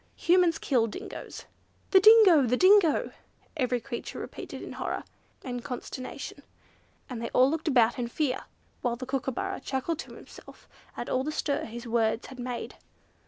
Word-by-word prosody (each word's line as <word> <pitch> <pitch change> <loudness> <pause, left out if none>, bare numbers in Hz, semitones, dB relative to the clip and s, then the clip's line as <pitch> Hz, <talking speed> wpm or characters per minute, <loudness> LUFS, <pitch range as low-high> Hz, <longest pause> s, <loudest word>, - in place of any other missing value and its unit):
"Humans 350 -1 +3
kill 240 -5 +1
Dingoes." 210 - -8 0.5
"The 380 - +8
Dingo! 415 -6 +8
The 250 +2 +2
Dingo!" 370 -2 +5 0.4
every 250 -4 0
creature 235 0 -6
repeated - - -7
in - - -8
horror - - -4 0.4
and 245 -2 -5
consternation; 260 +2 -7 0.7
and 245 -4 -6
they 230 - -3
all 260 +2 +5
looked 320 +1 -3
about 240 -4 +3
in 240 - -1
fear, 260 +1 -2 0.4
while 240 -2 0
the 255 +2 -7
Kookooburra 270 +9 -3
chuckled 290 +4 -3
to - - -8
himself - - -14 0.3
at - - -4
all 255 - 0
the 305 - -2
stir 290 -2 -1
his 235 +2 -8
words 225 -1 0
had 260 -1 -11
made. 245 -1 -5
260 Hz, 160 wpm, -28 LUFS, 240-320 Hz, 0.7 s, The